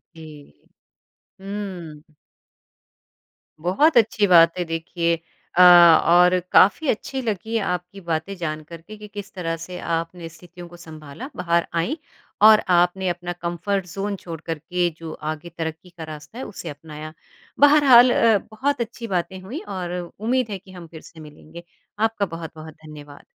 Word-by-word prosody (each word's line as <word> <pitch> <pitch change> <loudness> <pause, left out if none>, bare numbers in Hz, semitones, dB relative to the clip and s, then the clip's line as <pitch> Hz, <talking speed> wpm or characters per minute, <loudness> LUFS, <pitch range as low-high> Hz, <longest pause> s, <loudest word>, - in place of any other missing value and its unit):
जी। 150 - -14 0.8
हुँ। 190 -6 -7 1.6
बहुत 245 - +3
अच्छी 215 -2 +3
बात 170 -1 +6
है, 180 - 0
देखिए 170 +1 -1 0.4
अ, - - +7 0.4
और 180 +1 +5
काफ़ी 205 +11 +5
अच्छी 265 +4 -2
लगी 220 0 -3
है 220 - +1
आपकी 180 +2 -4
बातें 165 +4 -2
जानकर 155 0 -6
के, 215 +5 -12
कि 210 0 -11
किस 205 -1 -9
तरह 165 -3 -3
से 180 -1 -8
आपने 165 0 -3
स्थितियों 175 +1 -13
को 175 0 -14
सँभाला 160 - -10
बाहर 170 -1 0
आईं 270 - -2 0.5
और 215 -1 +8 0.2
आपने 180 +2 +1
अपना 175 0 -4
कम्फर्ट 180 +3 -2
ज़ोन 195 +3 -4
छोड़ 165 -3 -7
कर 165 -2 -3
के 175 +2 -1
जो 165 -1 -8 0.2
आगे 155 +2 -8
तरक्की 160 +2 -5
का 170 -2 -10
रास्ता 155 +10 -11
है 265 - -5
उसे 175 -5 -8
अपनाया। 155 +1 -9 0.5
बहरहाल 275 -4 +7
अ, 225 -3 +4
बहुत 265 +3 -1
अच्छी 235 0 -6
बातें 185 +2 -3
हुईं 250 - -7 0.2
और 180 0 -4
उम्मीद 225 +7 -2
है 200 - -4
कि 190 0 -17
हम 175 -2 -11
फिर 160 -1 -12
से 165 - -15
मिलेंगे। 155 +2 -13 0.4
आपका 220 -2 +1
बहुत-बहुत 160 -2 -9
धन्यवाद। 145 -2 -12
175 Hz, 155 wpm, -22 LUFS, 165-205 Hz, 1.6 s, और